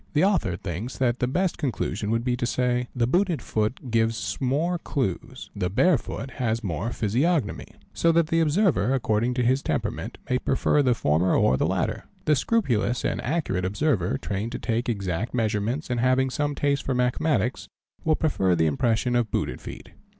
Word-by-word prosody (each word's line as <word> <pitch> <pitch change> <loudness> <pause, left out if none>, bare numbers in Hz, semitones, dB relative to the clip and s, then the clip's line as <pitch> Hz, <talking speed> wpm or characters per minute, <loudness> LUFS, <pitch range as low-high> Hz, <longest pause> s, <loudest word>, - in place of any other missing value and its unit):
The 150 +3 +3
author 185 - +2
thinks 100 +8 -5
that 125 -2 +1
the 125 - +1
best 180 +7 0
conclusion 125 -7 -2
would 115 +1 +1
be 125 0 +1
to 120 - -1
say: 125 0 0
"the 120 -2 +2
booted 175 +5 +1
foot 110 +3 -2
gives 115 0 0
more 155 +7 0
clues, 130 - -3
the 90 -3 -1
bare 150 - +3
foot 130 +4 -6
has 115 -1 0
more 95 +4 -2
physiognomy 125 - 0 0.2
"; - - -36
so 165 - +5
that 165 0 +3
the 165 +1 +1
observer, 155 - +2
according 120 0 0
to 125 - +1
his 130 +3 +2
temperament, - - -3
may 125 - +1
prefer 140 +3 +2
the 125 -3 +3
former 85 0 +2
or 65 - +4
the - - +1
latter. - - -1 0.2
The 150 - +4
scrupulous 125 - 0
and - - -1
accurate 135 - -1
observer, 105 - 0
trained 105 +4 -4
to - - -2
take 120 +1 -1
exact 100 +1 -2
measurements 115 +5 -1
and 120 - 0
having 130 +2 +2
some 145 +2 -1
taste 140 -1 +1
for 130 - -2
mathematics, 125 -1 0 0.4
will 160 -1 +3
prefer 95 - +1
the 80 - +2
impressions 115 - +1
of 120 -3 0
booted 65 - -2
feet. - - -9
125 Hz, 185 wpm, -25 LUFS, 110-145 Hz, 0.4 s, so